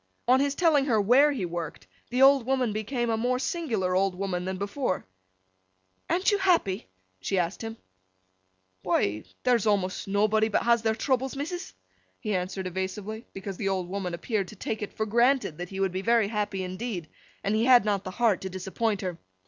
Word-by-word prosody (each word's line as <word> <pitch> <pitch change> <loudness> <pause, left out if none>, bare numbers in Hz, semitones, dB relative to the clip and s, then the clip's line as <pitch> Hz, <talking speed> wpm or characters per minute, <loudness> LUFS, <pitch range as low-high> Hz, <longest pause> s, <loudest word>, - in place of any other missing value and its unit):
On 255 +2 +5
his 280 0 +1
telling 305 -5 +3
her 230 -6 +2
where 255 +8 +5
he 240 -10 -2
worked, 170 - -5 0.2
the 255 +2 +3
old 275 -1 +7
woman 255 -3 0
became 230 +3 -1
a 225 - +1
more 250 +3 +1
singular 250 - -1
old 190 0 +2
woman 180 -2 -2
than 190 0 -3
before. 200 +1 -2 1.0
'An't 365 +5 +2
you 410 - +2
happy?' 335 - +2 0.3
she 190 - -1
asked 175 +1 -1
him. 225 0 -6 1.0
'Why—there's 215 - 0
awmost 195 -3 0
nobbody 215 +2 +2
but - - +1
has 235 -1 +3
their 220 0 +1
troubles, 265 +2 0
missus.' 350 +7 -5 0.4
He 215 -2 -2
answered 185 +1 -3
evasively, 190 +5 -4
because 195 -1 -6
the 195 - -1
old 185 -2 -1
woman 185 -2 -3
appeared 200 +1 -2
to 215 - -11
take 215 +2 -4
it 210 - -4
for 220 - 0
granted 235 - +2
that 175 0 -5
he 195 - -6
would 195 -1 +1
be 185 +1 -3
very 230 -1 +3
happy 210 -3 -2
indeed, 185 -2 -4 0.4
and 200 - 0
he 220 +2 +2
had 245 -4 +7
not 200 -2 0
the 185 - -5
heart 215 -1 +1
to 190 - -4
disappoint 190 +3 -2
her. 180 -3 -4
210 Hz, 190 wpm, -27 LUFS, 190-245 Hz, 1.0 s, old